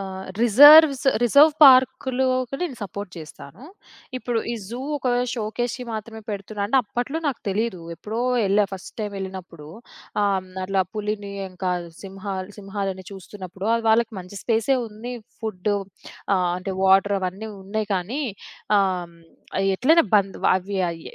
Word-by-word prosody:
ఆహ్, 190 -1 -6 0.2
reserves, 290 +5 +8 0.2
reserve 285 +6 +6
పార్క్‌లోకి 260 0 +4
నేను 300 -8 -3
support 200 -1 -6
చేస్తాను. 160 - -11 0.5
ఇప్పుడు 240 -2 -2
ఈ - - -2
జూ 240 +2 -6 0.2
ఒక 260 - -2 0.3
షోకేస్‌కి 240 +3 -3
మాత్రమే 220 +1 -6
పెడుతున్నాడు. 200 0 -4
అంటే 265 +5 +3
అప్పట్లో 245 +8 -3
నాకు 275 -4 -2
తెలీదు. 200 -2 -1 0.2
ఎప్పుడో 220 +2 -5 0.3
ఎళ్ళా. 205 +2 +3
ఫస్ట్ 190 - -8
టైమ్ 210 -1 -4
ఎళ్ళినప్పుడు 185 -5 -8 0.5
ఆహ్, 190 -2 0 0.2
అట్లా 190 0 +1
పులిని 210 -1 -4 0.2
ఇంకా 185 0 -3 0.3
సింహా 195 0 -6 0.2
సింహాలని 195 -2 -4
చూస్తున్నప్పుడు 190 +1 -7
అది 230 -1 -2
వాళ్ళకి 225 0 +2
మంచి 180 +2 -10
స్పేసే 230 +3 +2
ఉంది. 220 +4 -8 0.3
ఫుడ్డు, 205 -1 -1 0.6
ఆహ్, 180 -1 +1
అంటే 190 +1 -5
వాటర్ 195 +1 +4
అవన్నీ 190 +4 -4
ఉన్నాయి. 210 +2 -3
కానీ 215 +11 -2 0.6
ఆహ్, 180 -3 -1 0.6
ఎట్లైనా 315 - +4
బంధ్ 195 -1 0 0.2
అవి. 195 +1 -4
ఆహ్, 165 - -8
205 Hz, 135 wpm, -23 LUFS, 190-240 Hz, 0.6 s, reserves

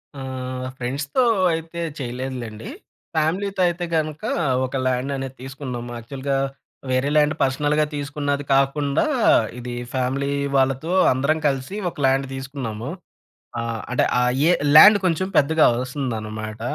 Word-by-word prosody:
ఆహ్, 130 -1 -5
ఫ్రెండ్స్‌తో 140 - -1 0.3
అయితే 165 +1 -5 0.2
చేయలేదులేండి. 125 - -5 0.5
ఫ్యామిలీ‌తో 185 +5 0
అయితే 175 0 -2
గనుక 155 -1 -2 0.4
ఒక 130 - -6
ల్యాండ్ 130 +2 0
అనేది 135 -1 -5
తీసుకున్నాం. 130 -2 -6
యాక్చువల్‌గా 135 +4 -3 0.5
వేరే 130 +2 +1
ల్యాండ్ 150 0 +3
పర్సనల్‌గా 145 +3 +1
తీసుకున్నది 145 0 -2
కాకుండా, 140 - +2 0.5
ఇది 125 0 -6 0.2
ఫ్యామిలీ 135 +2 -1 0.3
వాళ్ళతో 135 +5 +1 0.2
అందరం 140 +5 +1
కలిసి 135 +6 -2
ఒక - - -16
ల్యాండ్ 135 +1 +2
తీసుకున్నాము. 135 -4 -5 0.7
ఆహ్, 115 -1 -3
అంటే 125 - +3 0.2
ఆహ్, 125 0 +2 0.2
ఏ - - +5 0.3
ల్యాండ్ 205 +6 +10
కొంచెం 180 +1 +1
పెద్దగా 155 +2 +4 0.2
వస్తుందన్నమాట. 110 -5 -5
135 Hz, 120 wpm, -22 LUFS, 125-150 Hz, 0.7 s, ల్యాండ్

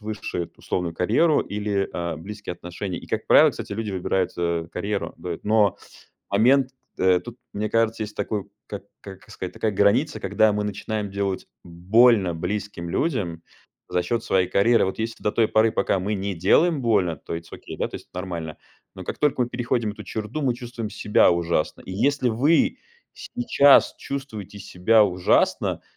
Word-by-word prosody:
выше 105 -4 -4
эту 85 - -19
условную 85 -2 -2
карьеру 120 - +3
или, 100 -1 -2
а, 85 -2 -3
близкие 100 +2 -7
отношения. 90 +1 -6
И, - - -11
как - - -3
правило, - - +7
кстати, - - -7
люди 110 0 -3
выбирают, 95 0 -1
э, 85 -1 -1
карьеру 100 +2 -3
быт, 85 -2 -6
но 105 -2 +3 0.5
момент, 130 +6 +4 0.3
кт - - -12
э, 90 -1 +4
тут, 120 +6 -10 0.2
мне 105 +1 -2
кажется, 115 -1 +1
есть 105 0 -7
такой, 105 -1 -3 0.2
как 100 -2 -7 0.2
как 95 -1 -12
сказать, 90 - -6
такая 110 - -1
граница, 105 +10 +2
когда 110 -1 +3
мы 105 0 -1
начинаем 105 0 -3
делать 100 -1 -2 0.2
больно 95 +2 +3
близким 90 0 -4
людям 90 - -1 0.5
за 90 - 0
счёт 115 +6 -2
своей 95 -2 +2
карьеры. 115 +3 +3
Вот 95 - -4
если 110 +1 -4
до 105 - +1
той 115 -2 +2
поры, 110 +1 +3
пока - - +1
мы 100 +3 -1
не 100 0 -3
делаем 150 - +3
больно, 100 -8 +2
то 85 - -6
it's 85 0 -11
okay, - - -9
да, - - -1
то - - -7
есть - - -13
нормально, 85 -4 -5 0.4
но - - -9
как - - -5
только 145 -3 +2
мы 120 - -2
переходим 120 -3 -1
эту 105 - -10
черту, 110 +8 -4
мы 130 -3 +1
чувствуем 120 -2 -6
себя 105 0 +3
ужасно. 85 -2 -1
И - - -8
если 130 +5 +1
вы 140 +9 +2 0.4
сейчас 145 - +4
чувствуете 120 -8 -6
себя 100 +3 +3
ужасно, 90 -2 +1
105 Hz, 180 wpm, -24 LUFS, 90-115 Hz, 0.5 s, правило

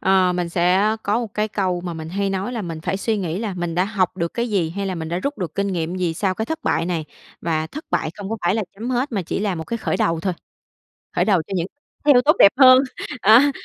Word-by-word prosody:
Ờ, 190 -1 +3
mình 180 -1 -2
sẽ 185 +5 +2
có 210 +4 +1
một 225 -4 -6
cái 215 0 0
câu 185 -4 -1
mà 175 -1 -5
mình 160 -1 -6
hay 195 +3 -1
nói 195 +5 -2
là 230 -4 -3
mình 165 -3 -5
phải 190 - -2
suy 220 +3 -1
nghĩ 180 -3 -2
là 210 -3 -3
mình 175 -2 -3
đã 180 +2 +2
học 195 -3 -1
được 170 0 -2
cái 235 0 -1
gì, 180 -6 +1
hay 200 +3 -3
là 190 - -2
mình 160 -2 -5
đã 170 +2 -1
rút 280 +9 -3
được 175 -6 -4
kinh 200 0 0
nghiệm 175 -2 -2
gì 175 -3 -1
sau 190 +2 0
cái 220 - -2
thất 320 +3 -4
bại 165 - 0
này. 170 -3 -2 0.4
Và 160 -2 -1
thất 305 - -8
bại - - 0
không 200 -1 -7
có 225 - -1
phải 175 +2 +3
là 220 - 0
chấm 225 +5 -5
hết, 255 +1 -1
mà 200 - -1
chỉ 170 - -3
là 205 -2 0
một 160 -1 -5
cái 235 - -3
khởi 225 - -1
đầu 165 -1 +1
thôi, 185 +2 -1 0.8
khởi - - +2
đầu 190 -6 +3
cho - - -12
những 175 -1 -1 0.4
điều 280 -4 +7
tốt 300 +5 +4
đẹp 200 - +8
hơn. 255 -1 +9 0.4
À. 240 +8 +7
190 Hz, 275 wpm, -21 LUFS, 175-215 Hz, 0.8 s, hơn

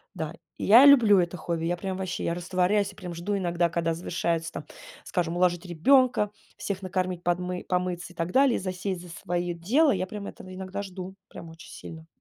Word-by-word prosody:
Да, - - -4 0.2
я 235 +6 +7
люблю 240 -8 +7
это 175 0 0
хобби. 165 0 -3
Я 175 +1 0
прям 190 +1 -4
ваще, 190 -1 -4
я 170 - 0
растворяюсь 185 +3 0
и - - -19
прям 175 -1 -7
жду 185 +5 -2
иногда, 175 -2 0
когда 165 -1 0
завершается, 170 -1 -2
там, - - -7 0.4
скажем: 175 -2 -2
уложить 175 0 +1
ребёнка, 210 - +3 0.3
всех 195 -1 -4
накормить, 185 -1 -2
подмы 180 +1 -2
помыться 180 -1 -2
и - - -25
так 165 +1 -2
далее, 270 -2 +4
и - - -1
засесть 185 0 -4
за 180 - -12
своё 175 +1 -3
дело. 245 - +3
Я 185 -2 -1
прям 200 +1 -7
это - - -9
иногда 190 +1 -5
жду, 190 -1 -8
прям 165 - -10
очень 165 +1 -13
сильно. 160 -1 -10
180 Hz, 195 wpm, -27 LUFS, 170-195 Hz, 0.4 s, я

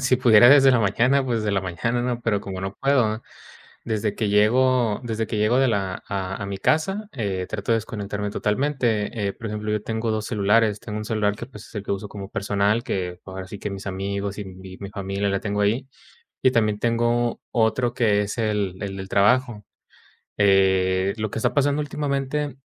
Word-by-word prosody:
si 130 0 +3
pudiera 120 -2 +7
desde 135 -1 +7
la 125 - +4
mañana, 120 +7 +2
pues, 120 -3 0
desde 105 -1 -1
la 95 - +1
mañana, 115 +7 -1
¿no?, 120 -1 -2
pero 110 -4 0
como 95 -2 -6
no 95 +1 -4
puedo. 120 -5 +2 0.6
Desde 110 -2 -2
que 110 - -1
llego 115 +2 +3
desde 115 -1 -2
que 110 - -3
llego 105 +4 +3
de 135 - +4
la 100 -5 -2
a 95 -1 -3
a - - -2
mi 100 -1 -4
casa, 195 - 0
eh, 100 -8 -3
trato 110 +2 -3
de - - +5
desconectarme 105 -2 -4
totalmente. 115 -3 0
Eh, 100 - -2
por 115 - -10
ejemplo, 105 0 -4
yo 105 -1 -1
tengo 110 0 -2
dos 110 0 -1
celulares. 105 0 +2
Tengo 105 -1 -6
un 105 - -5
celular 105 -2 0
que, 120 - -7
pues, 110 -5 -12
es - - -18
el 105 - -3
que - - -4
uso 100 +1 -3
como 100 -1 -8
personal, 100 +3 0
que 90 -6 -3
ahora 95 0 -7
sí 100 +2 -9
que - - -4
mis 100 0 -7
amigos 100 +1 -3
y 100 - -5
mi 95 0 -11
familia 100 0 -2
la 100 0 0
tengo 105 0 -2
ahí. 115 +7 +1 0.6
Y 130 - +5
también 110 -4 +2
tengo 120 +1 +1
otro 120 +1 +1
que 105 -4 +3
es 105 +3 -4
el 105 -4 -1
el 95 -1 -4
del 95 0 -7
trabajo. 105 +1 +2 0.7
Eh, 95 -1 +3
lo 110 -1 -3
que - - -3
está 125 +1 0
pasando 145 +1 +2
últimamente 145 -1 -2
105 Hz, 205 wpm, -23 LUFS, 100-120 Hz, 0.7 s, pudiera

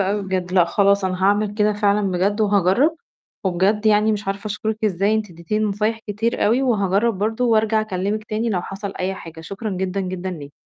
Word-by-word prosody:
أوي 200 +2 0
بجد، 185 -2 -3
لأ 180 -2 +5
خلاص 200 +3 +2
أنا 185 0 -2
هاعمل 205 +1 +2
كده 210 0 +2
فعلًا 205 -1 +1
بجد 195 +4 0
وهاجرّب، 205 - +3 0.5
وبجد 195 +4 +1
يعني 215 0 +4
مش 210 -1 -4
عارفة 200 +2 -3
أشكرِك 215 +1 -3
إزاي 200 +1 +1
أنتِ 215 -3 -2
ادّيتيني 175 +6 -2
نصايح 215 +2 0
كتير 220 +3 -1
أوي، 240 +5 +2
وهاجرّب 210 -3 +1
برضه 220 +4 0
وأرجع 220 -2 +3
أكلمِك 210 +1 -2
تاني 220 +2 -2
لو 180 -4 -1
حصل 195 +1 -6
أي 190 +1 -1
حاجة، 165 -3 -10
شكرًا 195 +6 -5
جدًا 190 0 -2
جدًا 185 0 -4
ليكِ. 145 -5 -8
205 Hz, 190 wpm, -21 LUFS, 190-215 Hz, 0.5 s, لأ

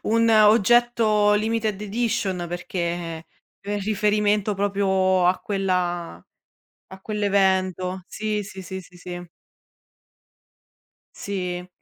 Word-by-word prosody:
un 230 +1 +3
oggetto 215 0 +4
limited 215 -1 0
edition 205 -5 -1
perché 170 -1 -4 0.4
in 205 0 -1
riferimento 210 0 +1
proprio 190 -2 +1
a 180 +1 +3
quella 180 - -2 0.7
a 190 - -10
quell'evento. 190 -3 0
Sì, 210 0 -3
sì, 190 -1 -9
sì, 190 +1 -6
sì, 180 0 -17
sì. 175 0 -8 1.9
Sì. 180 -2 -4
195 Hz, 90 wpm, -23 LUFS, 180-210 Hz, 1.9 s, oggetto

